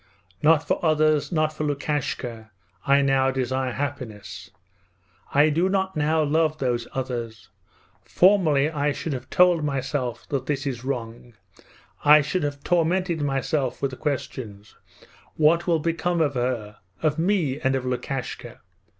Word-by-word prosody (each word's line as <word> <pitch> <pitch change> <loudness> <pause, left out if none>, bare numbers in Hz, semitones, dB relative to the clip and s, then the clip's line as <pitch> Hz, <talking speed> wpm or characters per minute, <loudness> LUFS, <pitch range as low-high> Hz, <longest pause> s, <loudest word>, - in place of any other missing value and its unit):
Not 155 0 +4
for - - -1
others, 155 -1 +2
not 155 -2 +1
for 155 - -4
Lukashka, 135 -6 -3 0.4
I 140 +1 +5
now 135 -1 +3
desire 130 0 -1
happiness. 125 -10 -6 0.8
I 145 +2 +4
do 170 +5 +1
not 190 -1 -1
now 155 +1 +2
love 155 +1 +1
those 120 -4 -1
others. 120 -4 -5 0.5
Formerly 175 -7 +3
I 150 -2 -1
should 160 - -4
have 130 -1 -6
told 180 -3 +4
myself 135 -4 -3
that 135 -2 -2
this 145 -1 -2
is 125 -4 -4
wrong. 120 -2 -5 0.7
I 150 +1 +8
should 175 +6 -2
have 145 -1 -4
tormented 175 0 +1
myself 135 -1 -1
with 140 - -1
the - - -7
questions: 110 -7 -5 0.6
What 165 +3 +3
will 170 -2 +3
become 170 +2 -1
of 150 -3 +1
her, 120 -5 -3 0.2
of 155 0 +1
me, 165 -7 +1
and 135 -2 +1
of 130 -1 -2
Lukashka? 125 -1 -4
145 Hz, 140 wpm, -24 LUFS, 130-155 Hz, 0.8 s, I